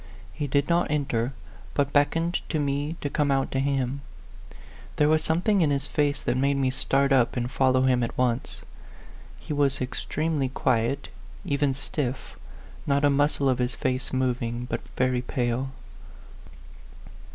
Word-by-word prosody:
He 150 -2 -3
did 140 +1 +1
not 170 0 +2
enter, 135 -5 0 0.4
but 140 -1 +1
beckoned 165 +4 +2
to 160 - 0
me 145 +2 -1
to - - -1
come 145 -1 +1
out 135 -1 +1
to 135 - 0
him. 135 -1 -1 0.9
There 150 - +3
was 155 0 +3
something 180 +6 +2
in 155 - +3
his 140 -1 0
face 145 -1 0
that - - 0
made 140 +1 +2
me 130 -1 +1
start 135 +1 +1
up 125 -2 +3
and 120 +1 -2
follow 130 -1 +3
him 130 -1 +3
at 115 - -3
once. 125 -1 -1 0.8
He - - -6
was 140 -2 +1
extreme 150 +5 -2
ly 135 -1 0
quiet, 130 +2 0 0.4
even 140 -1 +1
stiff, 135 -1 -4 0.5
not 140 0 +3
a 145 - +4
muscle 140 0 +2
of 130 -1 +2
his 125 -1 0
face 130 0 -2
moving, 125 -2 -1
but - - -3
very 125 -1 +1
pale. 125 +1 -1
135 Hz, 160 wpm, -26 LUFS, 130-145 Hz, 0.9 s, a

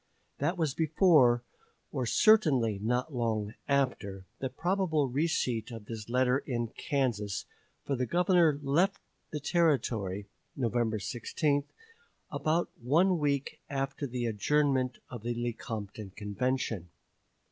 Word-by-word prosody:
That 165 +6 0
was 155 -5 0
before, 150 -7 +4 0.5
or 130 -3 -2
certainly 135 - +4
not 125 +7 0
long 110 -4 -1
after, 115 -9 0
the 130 - -2
probable 160 0 +1
receipt 130 -5 0
of 115 -3 -8
this 110 0 -7
letter 125 +1 +3
in 120 -4 -3
Kansas, 115 -8 -1 0.4
for 140 - 0
the 125 -1 -1
Governor 175 - +4
left 170 +9 +2 0.3
the 150 - -4
Territory 120 - +1 0.3
(November 120 -3 0
16) 140 +7 -1 0.7
about 165 +2 0
one 170 +8 +3
week 140 -2 -1
after 140 +1 -2
the 125 -1 -3
adjournment 130 +3 +1
of 120 -3 -6
the 120 +2 -2
Lecompton 110 -3 -4
Convention. 105 -2 -2
130 Hz, 115 wpm, -30 LUFS, 115-150 Hz, 0.7 s, before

